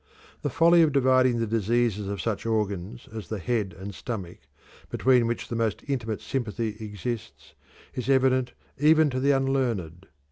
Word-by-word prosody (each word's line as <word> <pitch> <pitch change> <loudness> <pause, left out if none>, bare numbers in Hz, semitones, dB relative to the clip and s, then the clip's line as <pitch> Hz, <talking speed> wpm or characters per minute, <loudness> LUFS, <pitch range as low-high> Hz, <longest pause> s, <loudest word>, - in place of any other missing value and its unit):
The - - -1
folly 170 +1 +5
of 160 -2 +4
dividing 130 -2 +4
the 115 - 0
diseases 110 -1 0
of 100 -1 -4
such 110 -1 -2
organs 105 +1 -2
as 110 -2 -6
the 110 - -4
head 100 -2 -2
and 100 +2 -7
stomach, 95 -5 -6 0.5
between 125 -2 +3
which 120 - -3
the 120 - -4
most 115 -3 -1
intimate 115 -6 -2
sympathy 110 -1 -3
exists, 110 +2 -6 0.4
is 125 +1 -4
evident 130 -2 +3 0.3
even 155 0 +5
to 130 - -2
the 140 +2 +1
unlearned. 125 - 0
115 Hz, 155 wpm, -26 LUFS, 105-130 Hz, 0.5 s, folly